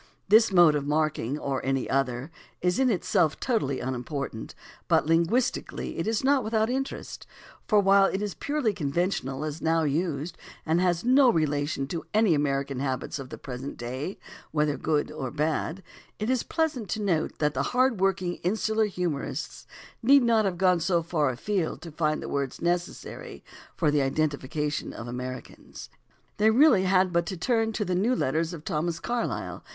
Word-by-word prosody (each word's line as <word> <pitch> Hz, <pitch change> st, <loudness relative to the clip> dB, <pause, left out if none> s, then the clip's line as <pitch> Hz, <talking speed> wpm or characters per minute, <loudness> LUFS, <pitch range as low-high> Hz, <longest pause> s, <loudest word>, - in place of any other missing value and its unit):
This 215 Hz, +2 st, +6 dB
mode 175 Hz, -4 st, +6 dB
of 145 Hz, -1 st, -2 dB
marking, 150 Hz, -3 st, 0 dB
or 135 Hz, -3 st, -3 dB
any 135 Hz, 0 st, 0 dB
other, 135 Hz, +2 st, -1 dB, 0.3 s
is 180 Hz, +4 st, +1 dB
in 265 Hz, -1 st, +4 dB
itself 180 Hz, -6 st, +1 dB
totally 180 Hz, -, 0 dB
unimportant, 130 Hz, -2 st, -4 dB, 0.3 s
but -, -, +3 dB
linguistically 170 Hz, +10 st, 0 dB
it -, -, -2 dB
is 225 Hz, +1 st, 0 dB
not 270 Hz, -1 st, +3 dB
without 220 Hz, +1 st, +1 dB
interest, 270 Hz, +1 st, -4 dB, 0.4 s
for 210 Hz, -, +4 dB
while 195 Hz, 0 st, +5 dB
it 190 Hz, -, 0 dB
is 205 Hz, -2 st, -3 dB
purely 285 Hz, -7 st, -1 dB
conventional 145 Hz, -3 st, -2 dB
as 155 Hz, +1 st, -5 dB
now 165 Hz, 0 st, +2 dB
used 155 Hz, +1 st, -2 dB, 0.3 s
and 165 Hz, +2 st, +2 dB
has 175 Hz, -2 st, +1 dB
no 255 Hz, +2 st, +5 dB
re 160 Hz, -5 st, +2 dB
lation 145 Hz, -1 st, -2 dB
to 165 Hz, 0 st, -4 dB
any 215 Hz, -5 st, +4 dB
American 140 Hz, -2 st, -1 dB
habits 135 Hz, +1 st, -3 dB
of 135 Hz, -2 st, -8 dB
the -, -, -8 dB
present 130 Hz, +1 st, -7 dB
day, 130 Hz, +10 st, -5 dB, 0.3 s
whether 150 Hz, -1 st, +1 dB
good 150 Hz, -2 st, -1 dB
or 130 Hz, -, -4 dB
bad, 155 Hz, +5 st, -2 dB, 0.3 s
it 215 Hz, +4 st, -1 dB
is 255 Hz, -2 st, +1 dB
pleasant 295 Hz, -, -2 dB
to 220 Hz, -, -2 dB
note 175 Hz, -7 st, 0 dB
that 150 Hz, -1 st, +1 dB
the -, -, -1 dB
hard 255 Hz, -3 st, +2 dB
worked 195 Hz, -1 st, +1 dB
insular 215 Hz, +5 st, 0 dB
humorists 175 Hz, -7 st, -4 dB, 0.3 s
need 270 Hz, +3 st, +6 dB
not 225 Hz, -2 st, +3 dB
have 185 Hz, -3 st, -1 dB
gone 180 Hz, -1 st, +3 dB
so 170 Hz, 0 st, +1 dB
far 155 Hz, -4 st, +1 dB
afield 170 Hz, -, -2 dB
to 165 Hz, -, -8 dB
find 155 Hz, 0 st, -1 dB
the -, -, -5 dB
words 140 Hz, -2 st, -3 dB
necessary 175 Hz, +1 st, -3 dB, 0.3 s
for 155 Hz, -5 st, +2 dB
the 145 Hz, -, +2 dB
identifica 145 Hz, +1 st, -1 dB
tion 150 Hz, -, -4 dB
of 120 Hz, -, -8 dB
Americans. 125 Hz, +1 st, -8 dB, 0.5 s
They 215 Hz, +1 st, +4 dB
really 230 Hz, -5 st, +5 dB
had 185 Hz, -1 st, +3 dB
but 170 Hz, 0 st, +1 dB
to 190 Hz, -, -4 dB
turn 225 Hz, +4 st, +1 dB
to 210 Hz, -, -1 dB
the 185 Hz, -, -1 dB
New 215 Hz, +8 st, +2 dB
Letters 160 Hz, -, 0 dB
of 165 Hz, -3 st, -9 dB
Thomas 165 Hz, +2 st, -1 dB
Carlyle 240 Hz, +5 st, -3 dB
(vol. -, -, -29 dB
170 Hz, 180 wpm, -27 LUFS, 145-210 Hz, 0.5 s, This